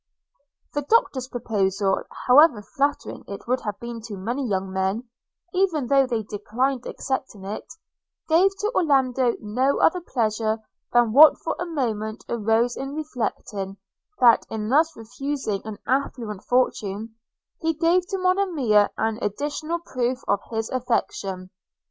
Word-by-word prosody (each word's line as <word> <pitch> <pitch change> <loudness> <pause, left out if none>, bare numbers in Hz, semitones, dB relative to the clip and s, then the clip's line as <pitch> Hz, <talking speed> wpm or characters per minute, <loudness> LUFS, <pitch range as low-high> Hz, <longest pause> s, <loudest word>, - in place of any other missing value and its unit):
The 290 - 0
Doctor's 285 - +2
proposal, 200 -5 0 0.2
however 255 -4 +6
flattering 285 +5 -2
it 200 +2 -8
would 255 +1 +1
have 210 -2 -4
been 235 -1 -6
to 205 -3 -6
many 240 +9 -2
young 190 -1 -1
men, 190 +4 0 0.5
even 360 -7 +1
though 270 +1 +4
they 230 -3 -1
declined 245 +5 -2
accepting 260 -7 -4
it, 205 +9 -6 0.6
gave 340 +4 +5
to 425 +2 -1
Orlando 265 - +2
no 250 +6 0
other 360 +2 +3
pleasure 220 -6 0 0.3
than 240 -2 +3
what 300 +4 +9
for - - -3
a 355 - -3
moment 220 -8 -3
arose 230 +2 +1
in 270 +2 -5
reflecting, 220 -9 -4 0.4
that, 240 -2 +6
in 215 -1 -3
thus 315 +5 +3
refusing 245 -2 -3
an 215 -2 -6
affluent 235 -6 -2
fortune, 220 -3 0 0.5
he 325 0 0
gave 345 +3 +2
to 390 - -2
Monimia 345 - +3
an 220 0 -1
additional 295 +10 -2
proof 255 -5 -2
of 200 0 +2
his 225 -1 -2
affection. 195 -7 -2
245 Hz, 135 wpm, -24 LUFS, 215-285 Hz, 0.6 s, what